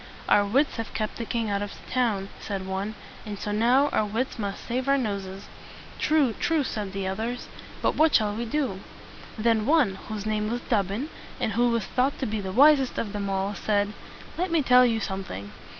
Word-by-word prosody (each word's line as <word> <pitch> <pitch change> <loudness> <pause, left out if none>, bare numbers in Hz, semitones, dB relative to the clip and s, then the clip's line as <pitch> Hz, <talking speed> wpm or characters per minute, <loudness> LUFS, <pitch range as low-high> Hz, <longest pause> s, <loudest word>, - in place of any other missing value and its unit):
"Our 205 - +5
wits 260 +9 +1
have 225 0 -5
kept 215 -1 -2
the 230 - -4
king 230 -3 -1
out 200 0 0
of 205 -1 -4
the - - -14
town," 220 -6 +1
said 195 -2 -4
one; 195 +3 -3 0.3
"and 210 -2 -6
so 210 - -4
now 245 +7 +4
our - - +1
wits 225 +4 -2
must 200 -2 -4
save 255 +2 -1
our 275 - +5
noses." 200 -5 -3 0.5
"True, 295 -6 +3
true!" 320 +5 +1
said 210 -6 -3
the 195 -1 -3
others. 225 +6 -3 0.4
"But - - +3
what 315 0 +4
shall 210 -2 +3
we 230 +3 -3
do?" 235 -6 -1 0.6
Then 225 0 +2
one, 275 -11 +3
whose 215 -2 -5
name 215 0 0
was 240 +1 -2
Dobbin, 210 - -1 0.3
and 220 - 0
who 240 +3 +3
was 230 -4 0
thought 260 +2 0
to 265 - -2
be 215 -2 -2
the 190 -1 -4
wisest 270 +3 +5
of 210 -2 -2
them 200 -1 -2
all, 195 +1 -1
said, 205 0 0 0.5
"Let 365 +1 0
me 330 -3 +2
tell 250 -1 +6
you 225 -2 +1
something. 190 - -5
220 Hz, 205 wpm, -26 LUFS, 200-250 Hz, 0.6 s, tell